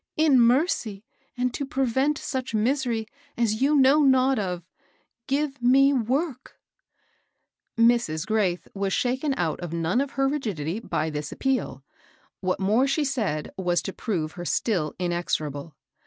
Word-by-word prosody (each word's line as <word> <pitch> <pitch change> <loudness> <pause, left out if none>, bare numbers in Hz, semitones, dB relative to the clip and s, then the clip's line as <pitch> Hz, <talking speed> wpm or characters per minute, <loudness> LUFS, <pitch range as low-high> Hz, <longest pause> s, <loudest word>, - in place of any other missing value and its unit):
In 305 -4 +5
mercy, 235 - +2 0.3
and 250 0 0
to 280 - -3
prevent 270 +2 0
such 260 -4 -4
misery 235 0 0 0.3
as 220 -1 0
you 290 +3 +3
know 280 +2 +5
not 265 -2 +4
of, 180 -3 -4 0.6
give 275 -1 -1
me 270 +3 +5
work! 260 +3 -2 0.6
" - - -46 0.5
Mrs. 230 -10 +2
Graith 200 -5 0
was 195 -1 -2
shaken 265 +3 0
out 165 -3 -1
of 175 -2 -6
none 170 +8 +1
of 280 - -2
her 270 0 +1
rig* 290 +1 -1
idity 190 - -4
by 155 0 -1
this 150 0 -5
appeal. 255 - -2 0.6
What 185 -1 -1
more 215 +8 +2
she 290 +2 0
said 210 - -2
was 175 -2 +1
to 195 - -5
prove 165 -9 -3
her 175 - -8
still 175 -4 -1
inexorable. 165 -4 -3
230 Hz, 150 wpm, -25 LUFS, 180-270 Hz, 0.6 s, In